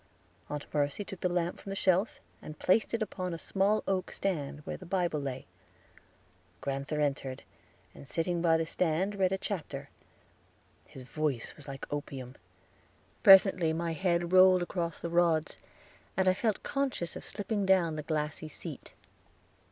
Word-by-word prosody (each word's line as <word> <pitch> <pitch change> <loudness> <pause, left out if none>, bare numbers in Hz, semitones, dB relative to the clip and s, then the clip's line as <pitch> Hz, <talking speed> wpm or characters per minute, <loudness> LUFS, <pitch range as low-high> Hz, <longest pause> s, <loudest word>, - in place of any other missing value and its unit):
Aunt 150 -1 -4
Mercy 145 +6 0
took 195 - -8
the 180 - 0
lamp 175 0 -1
from - - -9
the 195 - -3
shelf, 190 +2 +2 0.2
and 155 - -9
placed 215 +4 +2
it 225 - 0
upon 185 -4 -4
a - - -5
small 200 +5 +1
oak 190 -1 0
stand, 150 -6 -3
where - - -5
the 185 - -10
Bible 175 -4 0
lay. 135 -2 -5 1.1
Grand'ther 140 +2 -3
entered, 135 -3 -1 0.5
and 140 - -12
sitting 170 +2 -1
by 165 -1 +4
the 160 - 0
stand 180 +4 0
read 190 -2 +1
a 195 - +1
chapter. 150 -8 -5 1.0
His 130 - -11
voice 140 -2 -2
was 150 -2 -12
like 135 0 -6
opium. 135 -3 -5 0.9
Presently 190 -4 +7
my 165 0 -1
head 170 +1 0
rolled 185 -1 +7
across 170 -1 -3
the - - -4
rods, 170 -2 +2 0.6
and 190 0 +2
I 185 - +6
felt 215 +1 -1
conscious 270 -11 -2
of - - -7
slipping 205 0 -2
down 175 -4 +3
the 155 - -3
glassy 155 0 -3
seat. 155 - -9
170 Hz, 160 wpm, -31 LUFS, 150-190 Hz, 1.1 s, Presently